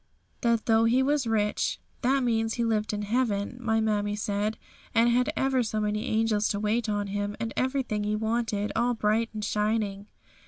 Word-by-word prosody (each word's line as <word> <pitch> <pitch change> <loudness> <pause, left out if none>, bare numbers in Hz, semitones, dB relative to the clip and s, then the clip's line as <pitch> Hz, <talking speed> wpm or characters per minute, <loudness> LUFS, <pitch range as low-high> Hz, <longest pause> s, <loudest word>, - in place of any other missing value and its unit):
"That 235 -2 +1
though 225 0 +4
He 250 +3 +3
was 285 -2 +1
rich, 210 -2 0
" - - -37
that 265 +2 +2
means 225 -2 +1
He 235 - 0
lived 215 -2 0
in 210 0 -3
heaven, 220 0 -1
my 225 -2 +1
mammie 205 -1 0
said, 210 +1 -1 0.4
and 230 +1 +5
had 250 +1 +2
ever 265 -1 +2
so 220 -2 -2
many 210 +2 -1
angels 220 -2 +1
to 205 - -1
wait 215 +2 0
on 205 -1 0
Him, 205 +1 -3
and 225 0 -3
everything 255 -5 -1
He 210 +1 0
wanted, 220 -1 -1
all 245 0 +1
bright 220 +1 +1
and 215 -1 -4
shining. 210 -1 -1
220 Hz, 190 wpm, -27 LUFS, 210-235 Hz, 0.4 s, and